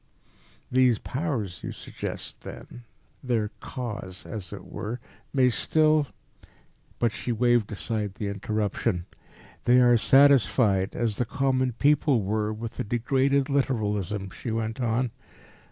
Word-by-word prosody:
"These 125 -2 +4
Powers, 125 - -3
you - - -4
suggest, - - -6
then 120 -1 -10 0.4
their 115 -5 0
Kas, 105 -7 -6
as 100 -6 -6
it - - -8
were 115 +4 -5 0.3
may 130 -2 +4
still 155 +3 +3 0.5
" - - -34
But 120 -2 +2
she 120 - -4
waved 120 -1 +2
aside 105 -1 -3
the 105 - -3
interruption. 100 -2 -1 0.6
"They 125 +1 +6
are 120 -1 +6
satisfied, 115 -7 +4
as 115 -3 -1
the 125 - +1
common 130 -1 0
people 145 -2 +3
were, 105 +2 0
with 110 +1 -6
a - - +1
degraded 130 +5 +1
literalism," 105 - -1
she 120 - -6
went 115 +1 -2
on. 120 +1 0
115 Hz, 130 wpm, -26 LUFS, 105-130 Hz, 0.6 s, They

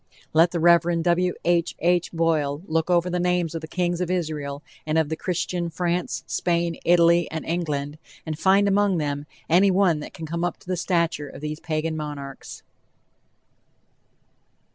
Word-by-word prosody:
Let 165 +2 +5
the 170 - -3
Rev. 170 0 +4
W. 180 +1 +2
H. 170 -1 +1
H. 175 0 +1
Boyle 160 -3 0
look 160 0 -1
over 175 0 +3
the 180 0 -1
names 175 -2 0
of 165 - -4
the 160 - -7
kings 175 +1 -1
of 180 - -1
Israel 150 -5 -3 0.2
and 155 +1 -1
of 160 -1 +1
Christian 175 -1 -2
France, 170 -6 -2
Spain, 170 -1 -1
Italy 170 0 +4
and 160 -1 -5
England, 150 -3 -2 0.3
and 160 -1 -3
find 195 +1 +4
among 200 -1 +2
them 145 -1 -3 0.2
any 185 +4 +5
one 185 -4 +3
that 150 - -9
can 165 - -6
come 170 +2 -3
up 175 -1 -1
to - - -23
the 185 - 0
stature 170 -4 0
of 135 - -11
these 150 0 -4
Pagan 160 0 -2
monarchs. 145 -3 -7
170 Hz, 165 wpm, -24 LUFS, 155-175 Hz, 0.3 s, Let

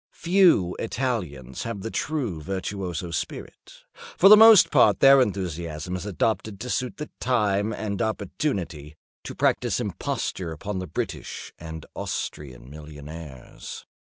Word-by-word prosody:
Few 170 - +3
Italians 95 - -3
have 115 -4 -5
the 115 - -5
true 125 - -2
virtuoso 95 -1 -4
spirit. 85 - -7 0.3
For 195 - +7
the 215 - +12
most 220 -2 +8
part - - +5
their 135 0 +7
enthusiasm 85 -5 -3
is 90 +2 -5
adopted 100 +1 -1
to 125 +1 -4
suit 125 -1 -2
the 150 - -7
time 105 -4 +1
and 105 -2 -3
opportunity—to 95 - -4
practise - - +1
imposture 85 -3 -3
upon 95 +5 -5
the 90 - -5
British 80 - -5
and 80 -1 -8
Austrian 65 -4 -5
millionaires. 75 -1 -10
95 Hz, 125 wpm, -25 LUFS, 80-115 Hz, 0.3 s, the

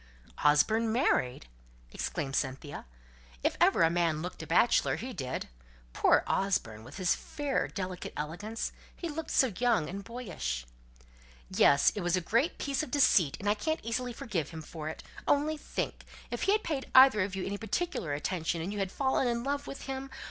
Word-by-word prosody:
"Osborne 220 +10 +4
married!" 130 - +1 0.5
exclaimed 135 0 -3
Cynthia. 135 - -3 0.6
"If - - +1
ever - - +5
a 165 - +4
man 165 -2 +1
looked 180 - -6
a 160 - -7
bachelor, 175 +9 +3
he 255 +2 -6
did. 130 - -4 0.5
Poor - - +4
Osborne! 120 - 0
with 130 +8 -11
his 185 -3 +2
fair 290 -2 -2
delicate 185 -2 -5
elegance, 190 +9 -4 0.2
he 345 - -5
looked 315 +1 -5
so 260 -6 +3
young 230 -10 +2
and 200 +4 -6
boyish!" 180 - -4 0.9
"Yes! 140 0 +5
it 205 - -4
was 175 +1 +1
a - - +2
great 235 - +1
piece 280 0 -1
of 310 - -5
deceit, 205 - +4
and 205 - -5
I 205 - +5
can't 315 +10 -1
easily 245 +2 -2
forgive 200 - -3
him 160 -1 -8
for 155 0 -6
it. 160 - -8 0.2
Only 295 +2 +2
think! 300 - -4 0.3
If - - -3
he - - +6
had 430 - +1
paid 280 -4 -3
either 260 -5 +8
of 190 +1 -1
you 190 - -3
any 200 +1 -3
particular 220 - -2
attention, 165 +2 -1
and 180 +5 -3
you 205 - -4
had 195 -1 -1
fallen 265 -1 +1
in 235 0 0
love 285 +1 -2
with 275 - -7
him! 270 0 -5
200 Hz, 185 wpm, -30 LUFS, 160-260 Hz, 0.9 s, either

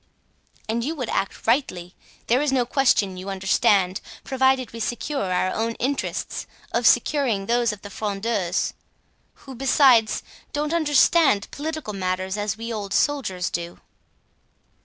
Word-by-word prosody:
"And 230 +2 -1
you 310 +6 -2
would 255 -6 -4
act 195 - -2
rightly. 190 -8 0 0.3
There 250 +4 +2
is 295 -2 +1
no 255 -2 +2
question, 235 -8 +2
you 185 +2 -6
understand, 195 0 +2 0.2
provided 265 -2 +1
we 230 - -7
secure 240 -2 -2
our 185 +1 +1
own 225 +1 -1
interests, 270 +3 -3 0.2
of - - +2
securing 245 -10 +2
those 235 +1 +2
of 210 -1 -10
the 205 - -9
Frondeurs; 200 -3 -1 0.7
who, 270 - -8
besides, 255 -3 +4 0.3
don't 295 +2 -1
understand 295 -6 +3
political 310 -6 -5
matters 185 0 -2
as 210 0 -2
we 230 +1 -5
old 200 -3 -4
soldiers 210 -12 0
do." 170 0 -5
230 Hz, 135 wpm, -23 LUFS, 195-270 Hz, 0.7 s, besides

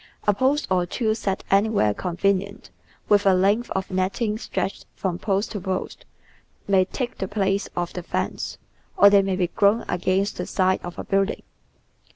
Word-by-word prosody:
A 205 - +5
post 265 +8 +1
or 180 -1 +2
two 220 +3 0
set 200 -3 -3
anywhere 200 - +3
convenient, 195 - -2 0.4
with 205 -1 +4
a 190 - +6
length 205 +6 +2
of 190 0 -3
netting 200 +4 -1
stretched 190 -2 -4
from 180 -2 -3
post 200 0 -1
to 210 - -4
post, 190 0 -4 0.6
maj^ 190 -1 +3
take 250 -2 -4
the 190 - -2
place 195 -1 0
of 175 -1 -2
the 180 - -4
fence, 170 - -3 0.4
or 200 0 +8
they 200 -1 +6
may 195 -1 -1
be 185 -1 +1
grown 210 +3 +2
against 185 +3 0
the - - -4
side 185 -1 +1
of 175 0 -7
a - - -4
building. 195 +1 0
195 Hz, 175 wpm, -24 LUFS, 185-205 Hz, 0.6 s, or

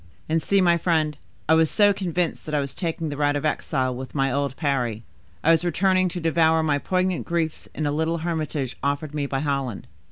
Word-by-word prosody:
And 160 +1 +1
see, 200 +3 +2
my 170 -2 +4
friend, 155 -3 +1 0.3
I 160 - +5
was 160 -1 +4
so 205 -1 +4
convinced, 180 -4 -2
that 155 - -2
I - - +3
was 140 -1 -3
taking 165 -3 -3
the 145 - -5
route 145 0 +2
of 145 - -2
exile, 130 -4 0
with 130 +3 -8
my 135 -1 +1
old 140 0 -1
Parry; 125 -7 -1 0.4
I 165 - +5
was 165 0 +3
returning 185 +1 +2
to 175 - -4
devour 160 -1 +3
my 145 -2 +1
poignant 185 +2 0
griefs 165 -2 -2
in 155 - -2
the 145 - +1
little 160 +3 0
hermitage 155 -5 -3
offered 140 +2 -2
me 145 -2 -1
by 135 -1 -2
Holland. 140 -7 -2
155 Hz, 215 wpm, -24 LUFS, 140-170 Hz, 0.4 s, I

